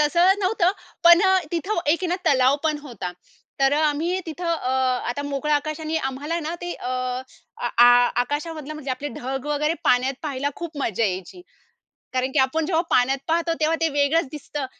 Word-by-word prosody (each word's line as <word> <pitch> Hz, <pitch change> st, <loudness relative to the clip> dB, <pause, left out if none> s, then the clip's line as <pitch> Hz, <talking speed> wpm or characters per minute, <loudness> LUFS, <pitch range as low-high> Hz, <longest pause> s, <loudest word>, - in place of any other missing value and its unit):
तसं 345 Hz, +6 st, +4 dB
नव्हतं 370 Hz, -2 st, +2 dB, 0.3 s
पण 340 Hz, 0 st, +8 dB
अ, 380 Hz, -1 st, +4 dB
तिथं 345 Hz, +5 st, -1 dB
एक 305 Hz, +3 st, +3 dB
आहे -, -, +1 dB
ना 355 Hz, -, 0 dB
तलाव 260 Hz, 0 st, +4 dB
पण 305 Hz, -1 st, +1 dB
होता. 235 Hz, -10 st, -6 dB, 0.5 s
तर 270 Hz, 0 st, +4 dB
अ, 290 Hz, -, +2 dB
आम्ही 335 Hz, +6 st, -1 dB
तिथं 330 Hz, +2 st, -6 dB
अ, 255 Hz, -5 st, -3 dB, 0.4 s
आता 285 Hz, +4 st, -4 dB
मोकळं 285 Hz, +1 st, -2 dB
आकाश 305 Hz, +2 st, -1 dB
आणि 315 Hz, 0 st, -2 dB
आम्हाला 295 Hz, +6 st, -3 dB
ना, 320 Hz, +2 st, -4 dB
ते 350 Hz, 0 st, -4 dB
अ, 250 Hz, -, -6 dB, 0.7 s
अ, -, -, -2 dB
आ 240 Hz, -, +9 dB, 0.4 s
आकाशामधलं 300 Hz, +3 st, -5 dB
म्हणजे 295 Hz, -3 st, -6 dB
आपले 280 Hz, +3 st, -3 dB
ढग 265 Hz, +2 st, -4 dB
वगैरे 300 Hz, +2 st, 0 dB
पाण्यात 255 Hz, 0 st, +3 dB
पाहायला 285 Hz, -2 st, -2 dB
खूप 335 Hz, -3 st, -7 dB
मजा 225 Hz, +1 st, 0 dB
यायची. 190 Hz, -, -4 dB, 0.7 s
कारण 260 Hz, +1 st, -1 dB
की -, -, +1 dB
आपण 270 Hz, +4 st, +2 dB
जेव्हा 330 Hz, -1 st, +1 dB
पाण्यात 265 Hz, +2 st, +3 dB
पाहतो 335 Hz, +1 st, +1 dB
तेव्हा 315 Hz, +1 st, +2 dB
ते 325 Hz, -, +2 dB
वेगळंच 290 Hz, +3 st, +2 dB
दिसतं 295 Hz, -1 st, -5 dB
300 Hz, 185 wpm, -23 LUFS, 270-330 Hz, 0.7 s, आ